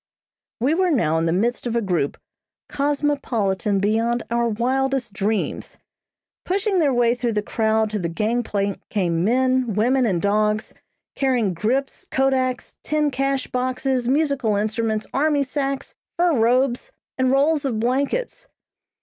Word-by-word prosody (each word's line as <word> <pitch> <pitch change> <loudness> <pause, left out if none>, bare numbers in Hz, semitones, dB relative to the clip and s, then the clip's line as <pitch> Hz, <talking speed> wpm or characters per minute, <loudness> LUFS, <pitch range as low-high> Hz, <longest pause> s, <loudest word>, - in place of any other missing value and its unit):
We 260 +6 +2
were 370 +2 +2
now 160 - +2
in 165 - 0
the - - +1
midst 235 +8 0
of 235 - -2
a - - +3
group, 175 -8 -1 0.5
cosmopolitan 270 -9 0
beyond 225 +4 +1
our 235 0 +1
wildest 255 +1 -1
dreams. 205 +2 -2 0.7
Pushing 390 +1 0
their 295 -4 +3
way 240 -2 +3
through 245 -1 -2
the 210 -1 -1
crowd 220 0 0
to 210 - -2
the 170 -2 -2
gangplank 210 0 -1
came 170 -4 0
men, 255 0 +1
women 245 +4 +2
and 185 -5 0
dogs, 210 +2 0 0.4
carrying 245 -8 +1
grips, 245 +10 -2
kodaks, 260 -1 0
tin 300 -1 0
cash 275 0 -1
boxes, 255 0 -1
musical 275 -5 +1
instruments, 215 +1 -1
army 290 0 +2
sacks, 275 0 -3 0.2
fur 350 -1 +3
robes, 250 - +1 0.3
and 260 0 +3
rolls 285 +3 +2
of 245 -6 -1
blankets. 285 - -1
245 Hz, 140 wpm, -22 LUFS, 215-275 Hz, 0.7 s, a